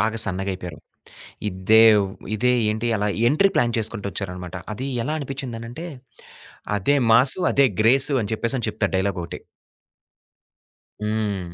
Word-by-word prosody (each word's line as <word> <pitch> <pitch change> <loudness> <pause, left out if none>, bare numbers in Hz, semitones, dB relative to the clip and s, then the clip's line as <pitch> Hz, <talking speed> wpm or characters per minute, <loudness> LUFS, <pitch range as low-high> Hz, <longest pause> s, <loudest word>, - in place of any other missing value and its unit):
బాగా 110 +1 0
సన్నగయిపోయారు 95 -2 -4 0.7
ఇదే 100 +4 +4 0.2
వ్ - - -2 0.3
ఇదే 125 +3 +2 0.2
ఏంటి 110 +2 -2
అలా 105 0 -1 0.2
ఎంట్రీ 195 +8 +3
ప్లాన్ 120 -1 +2
చేసుకుంటూ 110 -2 -2
ఒచ్చారు 95 -3 -5
అనమాట 90 0 -8 0.2
అది 130 +6 -5 0.2
ఎలా 155 - -2
అనిపిచ్చిందనంటే, 130 +1 -6 0.9
అదే 145 +9 +1
మాసు, 130 +9 +5
అదే 140 -1 +5
గ్రేసు 135 +5 +4
అని 100 - -5
చెప్పేసని 115 +1 -2
చెప్తారు 100 -2 -2
డైలాగొకటి. 90 -3 -3 1.6
హ్మ్. 105 -5 -3
110 Hz, 125 wpm, -22 LUFS, 100-125 Hz, 1.6 s, మాసు